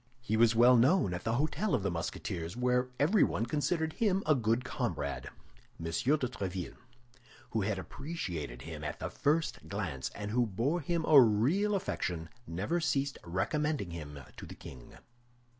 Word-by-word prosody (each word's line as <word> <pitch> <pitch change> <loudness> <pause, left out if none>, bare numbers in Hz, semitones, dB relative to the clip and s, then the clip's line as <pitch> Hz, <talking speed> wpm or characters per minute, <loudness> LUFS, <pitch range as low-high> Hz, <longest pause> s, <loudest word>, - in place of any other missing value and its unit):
He 120 -3 -2
was 115 0 +5
well 120 +2 +7
known 130 - +4
at 90 - -5
the 110 - +1
Hôtel 155 - +1
of 100 - -1
the 100 - 0
Musketeers, 85 +2 -4
where 125 0 +1
everyone 150 - +3
considered 160 +4 0
him 200 -4 +1
a 155 - +5
good 115 -1 +1
comrade. 115 - -3 0.5
M. 85 - -6
de 80 - -2
Tréville, 100 - -1 0.7
who 110 - 0
had 100 0 -1
appreciated 85 - -5
him 80 -2 -7
at 75 - -4
the - - -5
first 155 +3 0
glance 90 -10 -3
and 105 0 -4
who 120 +1 +2
bore 125 - 0
him 165 +2 -1
a 145 -3 +9
real 140 - +3
affection, 90 - -2 0.2
never 100 - -1
ceased 140 -4 0
recommending 100 - -1
him 75 -3 -7 0.2
to - - -8
the - - -9
king. 65 -3 -12
115 Hz, 160 wpm, -32 LUFS, -, 0.7 s, a